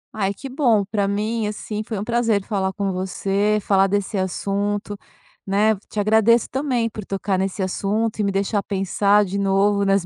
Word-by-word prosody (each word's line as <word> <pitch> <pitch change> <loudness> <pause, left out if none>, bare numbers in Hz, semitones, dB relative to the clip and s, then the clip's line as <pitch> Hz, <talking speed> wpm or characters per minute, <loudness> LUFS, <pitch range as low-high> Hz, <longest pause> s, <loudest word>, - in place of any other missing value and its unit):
Ai, 200 -2 0
que 270 +7 -8
bom. 245 -7 +2
Pra 200 -1 -1
mim, 215 +2 -1
assim, 210 0 -4
foi 215 -1 -5
um 200 - -3
prazer 230 -3 +1
falar 190 -3 -1
com 200 -1 -2
você, 195 +3 0
falar 195 -1 +3
desse 200 +2 -1
assunto, 200 +2 -2 0.5
né, 210 +3 +2
te 210 - -4
agradeço 220 +2 +4
também 255 -4 0
por 215 -1 -7
tocar 195 0 -2
nesse 190 +1 -2
assunto 210 +4 -1
e - - +2
me 200 - +1
deixar 200 +1 0
pensar 200 +1 +2
de 200 +1 -3
novo 200 +1 +2
nas 195 -2 +2
205 Hz, 180 wpm, -22 LUFS, 195-215 Hz, 0.5 s, agradeço